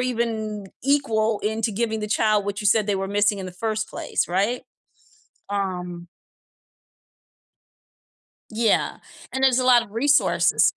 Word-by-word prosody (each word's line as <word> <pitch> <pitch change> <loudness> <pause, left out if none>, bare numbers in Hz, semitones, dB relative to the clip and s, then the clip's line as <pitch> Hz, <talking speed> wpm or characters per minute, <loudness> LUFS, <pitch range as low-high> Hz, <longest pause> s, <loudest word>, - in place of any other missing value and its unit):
even 225 -4 -2 0.2
equal 225 -7 +1
into 220 +1 -1
giving 220 +1 -1
the 210 - -3
child 215 -1 +2
what 205 +1 -3
you 210 - -1
said 210 +1 +3
they 205 - +1
were 195 0 -2
missing 205 0 +2
in 190 - -5
the 185 - -8
first 220 +3 -3
place, - - -2
right? 205 +8 0 0.9
Um 180 -3 -4 2.5
Yeah, 225 -1 +1 0.4
and 265 0 0
there's 260 -1 +4
a - - -1
lot 245 -2 +6
of 205 - -14
resources 285 +6 +3
215 Hz, 140 wpm, -23 LUFS, 200-235 Hz, 2.5 s, lot